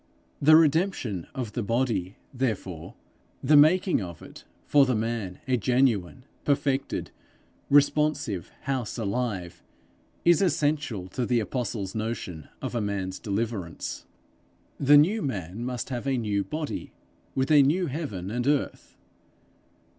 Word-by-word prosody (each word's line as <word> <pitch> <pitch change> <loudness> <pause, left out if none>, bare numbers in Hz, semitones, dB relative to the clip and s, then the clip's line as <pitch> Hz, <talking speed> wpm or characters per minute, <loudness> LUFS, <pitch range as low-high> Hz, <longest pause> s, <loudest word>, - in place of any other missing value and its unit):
The 155 +2 +7
redemption 155 - +2
of 120 -5 -4
the 120 - -2
body, 115 -4 -1 0.2
therefore, 95 -10 -3 0.5
the 150 - +5
making 165 - +5
of 85 -3 -8
it - - -13 0.2
for 145 -1 +5
the 130 - +1
man 110 -4 -2
a 130 -1 +2
genuine, 125 -2 +1 0.2
perfected, 140 -1 0 0.6
responsive 145 - +2
house 130 -5 -3
alive, 100 -5 -3 0.6
is 170 0 +5
essential 145 - 0
to 125 - -3
the 120 -1 +2
apostle's 110 -4 -3
notion 110 -8 -4
of - - -3
a 120 - 0
man's 100 -2 -3
deliverance. 105 -5 -4 0.7
The 145 +1 +7
new 195 +10 +4
man 100 - -4
must 125 0 -4
have 125 +1 -4
a 135 -1 +1
new 105 -4 0
body 155 +4 -5 0.4
with 130 +2 0
a 150 -2 +8
new 160 +7 +2
heaven 130 - -4
and 120 +2 -2
earth. 145 -1 -1
125 Hz, 130 wpm, -27 LUFS, 100-145 Hz, 0.7 s, a